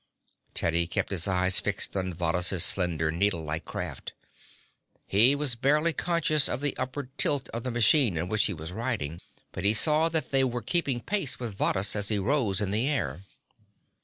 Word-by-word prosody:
Teddy 85 Hz, +1 st, +1 dB
kept 85 Hz, -, -3 dB
his 95 Hz, -1 st, -2 dB
eyes 95 Hz, 0 st, +3 dB
fixed 100 Hz, -1 st, -3 dB
on 95 Hz, -1 st, -2 dB
Varrhus' 90 Hz, +1 st, +1 dB
slender, 80 Hz, -4 st, +1 dB
needlelike 80 Hz, -3 st, -2 dB
craft. -, -, -6 dB, 0.9 s
He 115 Hz, +8 st, +3 dB
was 145 Hz, -3 st, +1 dB
barely 150 Hz, +7 st, +1 dB
conscious 155 Hz, -2 st, +2 dB
of 120 Hz, -, -2 dB
the 145 Hz, -1 st, -1 dB
upward 130 Hz, +1 st, -6 dB
tilt 145 Hz, -3 st, +1 dB
of 115 Hz, -, -5 dB
the 125 Hz, -, -4 dB
machine 120 Hz, -, +3 dB
in 85 Hz, +3 st, -3 dB
which 105 Hz, +2 st, +1 dB
he 100 Hz, -, -2 dB
was 80 Hz, +2 st, -8 dB
riding, 95 Hz, -, -4 dB, 0.3 s
but 95 Hz, -, -7 dB
he 105 Hz, +2 st, +3 dB
saw 155 Hz, +7 st, +4 dB
that 160 Hz, -1 st, -1 dB
they 135 Hz, -1 st, +3 dB
were 120 Hz, -2 st, -3 dB
keeping 140 Hz, -7 st, -1 dB
pace 190 Hz, -, 0 dB
with 115 Hz, -5 st, -6 dB
Varrhus 95 Hz, +1 st, +1 dB
as 105 Hz, -1 st, 0 dB
he 105 Hz, -, 0 dB
rose 105 Hz, -2 st, 0 dB
in 100 Hz, -2 st, -2 dB
the 115 Hz, +7 st, 0 dB
air. 85 Hz, -, -2 dB
110 Hz, 180 wpm, -27 LUFS, 90-135 Hz, 0.9 s, saw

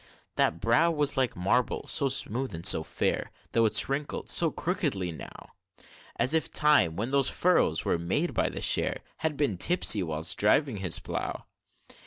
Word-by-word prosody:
That 80 Hz, -, +1 dB
brow 115 Hz, -, +2 dB
was 150 Hz, -3 st, -1 dB
like 130 Hz, -3 st, -1 dB
marble, 110 Hz, +7 st, -1 dB
so 140 Hz, -, 0 dB
smooth 130 Hz, -3 st, -2 dB
and 85 Hz, +1 st, -8 dB
so -, -, +6 dB
fair; -, -, -2 dB, 0.2 s
Though 115 Hz, -1 st, +2 dB
it's -, -, +4 dB
wrinkled 140 Hz, +2 st, -4 dB
so 165 Hz, -, +3 dB
crookedly 145 Hz, -, -3 dB
now, 80 Hz, -, -12 dB, 0.6 s
As 130 Hz, -, +2 dB
if 160 Hz, -, 0 dB
time, 145 Hz, -, +3 dB
when 115 Hz, +7 st, -3 dB
those 140 Hz, -1 st, +2 dB
furrows 170 Hz, -, +1 dB
were 85 Hz, -, 0 dB
made 120 Hz, -, -2 dB
by -, -, 0 dB
the -, -, -7 dB
share, -, -, -1 dB, 0.2 s
Had 155 Hz, -2 st, -3 dB
been 125 Hz, -11 st, -1 dB
tipsy 110 Hz, -, +3 dB
whilst 80 Hz, -1 st, -2 dB
driving 120 Hz, +3 st, +2 dB
his 95 Hz, -4 st, +1 dB
plough! -, -, -5 dB
125 Hz, 170 wpm, -27 LUFS, 90-150 Hz, 0.6 s, so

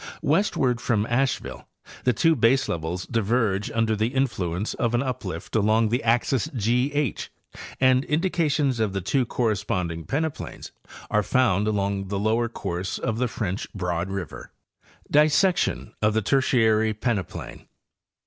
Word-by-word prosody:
Westward 130 Hz, -, +1 dB
from 110 Hz, -3 st, +1 dB
Asheville 130 Hz, +3 st, -1 dB, 0.4 s
the 125 Hz, -, +5 dB
two 160 Hz, +8 st, +3 dB
baselevels 90 Hz, -, +1 dB
diverge 110 Hz, -3 st, 0 dB
under 115 Hz, -1 st, +1 dB
the 110 Hz, +1 st, +1 dB
influence 105 Hz, -8 st, -1 dB
of 120 Hz, -1 st, 0 dB
an 120 Hz, -, +1 dB
uplift 115 Hz, -12 st, -5 dB
along 110 Hz, +1 st, +3 dB
the 120 Hz, +3 st, 0 dB
axis 120 Hz, 0 st, +1 dB
G 120 Hz, +5 st, +1 dB
H 145 Hz, -6 st, -2 dB, 0.5 s
and 130 Hz, 0 st, +4 dB
indications 150 Hz, -5 st, +1 dB
of 110 Hz, -3 st, 0 dB
the 95 Hz, -, -2 dB
two 125 Hz, +7 st, 0 dB
corresponding 95 Hz, -8 st, -1 dB
peneplains 155 Hz, +2 st, -4 dB, 0.4 s
are 105 Hz, -, +3 dB
found 105 Hz, -3 st, +2 dB
along 100 Hz, -2 st, -1 dB
the 100 Hz, +1 st, -2 dB
lower 110 Hz, +3 st, +1 dB
course 90 Hz, -4 st, -4 dB
of 110 Hz, -2 st, -2 dB
the 125 Hz, -, +1 dB
French 105 Hz, -5 st, -4 dB
Broad 90 Hz, -1 st, -2 dB
river. 95 Hz, -4 st, -6 dB, 0.6 s
DISSECTION 155 Hz, -, +2 dB
OF 105 Hz, 0 st, +2 dB
THE 110 Hz, -, +1 dB
TERTIARY 110 Hz, -4 st, +2 dB
PENEPLAIN. 105 Hz, -5 st, -4 dB
115 Hz, 135 wpm, -25 LUFS, 100-130 Hz, 0.6 s, the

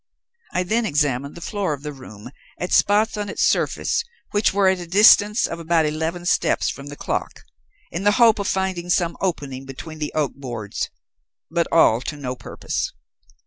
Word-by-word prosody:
"I 180 Hz, -, 0 dB
then 225 Hz, +6 st, 0 dB
examined 145 Hz, -3 st, 0 dB
the 170 Hz, -, -10 dB
floor 200 Hz, -6 st, -1 dB
of 140 Hz, -1 st, -8 dB
the 150 Hz, -1 st, -5 dB
room 125 Hz, -4 st, -11 dB, 0.3 s
at 180 Hz, -, -4 dB
spots 210 Hz, +2 st, +3 dB
on 205 Hz, -1 st, -3 dB
its -, -, -1 dB
surface 465 Hz, -, +1 dB, 0.3 s
which 205 Hz, +1 st, +2 dB
were 195 Hz, 0 st, +3 dB
at 190 Hz, -1 st, +3 dB
a 175 Hz, -, -7 dB
distance 210 Hz, +3 st, +6 dB
of 170 Hz, -, -5 dB
about 165 Hz, -1 st, +2 dB
eleven 160 Hz, +3 st, -2 dB
steps 175 Hz, -, +2 dB
from 140 Hz, 0 st, -9 dB
the 145 Hz, -, -7 dB
clock, -, -, -4 dB, 0.5 s
in 175 Hz, -, -4 dB
the 205 Hz, 0 st, +4 dB
hope 230 Hz, -2 st, +5 dB
of 200 Hz, -, -2 dB
finding 190 Hz, -2 st, -1 dB
some 175 Hz, -1 st, +1 dB
opening 140 Hz, -8 st, -2 dB
between 155 Hz, +4 st, -8 dB
the 150 Hz, -, -3 dB
oak 150 Hz, -3 st, 0 dB
boards; 120 Hz, -7 st, -5 dB, 0.6 s
but 170 Hz, 0 st, +1 dB
all 120 Hz, -8 st, +5 dB
to 150 Hz, -, -5 dB
no 130 Hz, -3 st, -4 dB
purpose. -, -, -4 dB
170 Hz, 185 wpm, -22 LUFS, 145-195 Hz, 0.6 s, distance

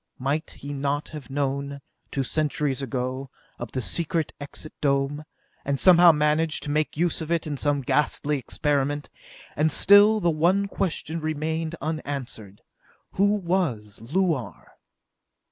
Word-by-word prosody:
Might 140 Hz, +4 st, -2 dB
he 145 Hz, 0 st, -7 dB
not 145 Hz, +1 st, -2 dB
have 150 Hz, -3 st, -9 dB
known, 140 Hz, 0 st, -2 dB, 0.3 s
two 135 Hz, -, -1 dB
centuries 145 Hz, -1 st, -1 dB
ago, 130 Hz, +1 st, -3 dB, 0.3 s
of 120 Hz, -2 st, -6 dB
the 130 Hz, -, -3 dB
Secret 165 Hz, +3 st, -1 dB
Exit 145 Hz, +2 st, -6 dB
Dome, 140 Hz, +1 st, 0 dB, 0.4 s
and 140 Hz, -1 st, -1 dB
somehow 175 Hz, 0 st, +8 dB
managed 150 Hz, 0 st, +1 dB
to 145 Hz, -, -3 dB
make 150 Hz, 0 st, -1 dB
use 175 Hz, 0 st, 0 dB
of 160 Hz, -, -5 dB
it 170 Hz, -1 st, +1 dB
in 150 Hz, -2 st, -3 dB
some 145 Hz, 0 st, 0 dB
ghastly 150 Hz, +1 st, 0 dB
experiment? 145 Hz, +2 st, -1 dB, 0.4 s
And 155 Hz, +1 st, +2 dB
still 205 Hz, +6 st, +7 dB
the 175 Hz, -4 st, +2 dB
one 180 Hz, +6 st, +2 dB
question 165 Hz, -4 st, -2 dB
remained 160 Hz, +1 st, -2 dB
unanswered: 140 Hz, -10 st, -5 dB, 0.5 s
Who 205 Hz, +2 st, +2 dB
was 170 Hz, -, -2 dB
Luar? 150 Hz, -, -2 dB
150 Hz, 135 wpm, -25 LUFS, 140-165 Hz, 0.5 s, somehow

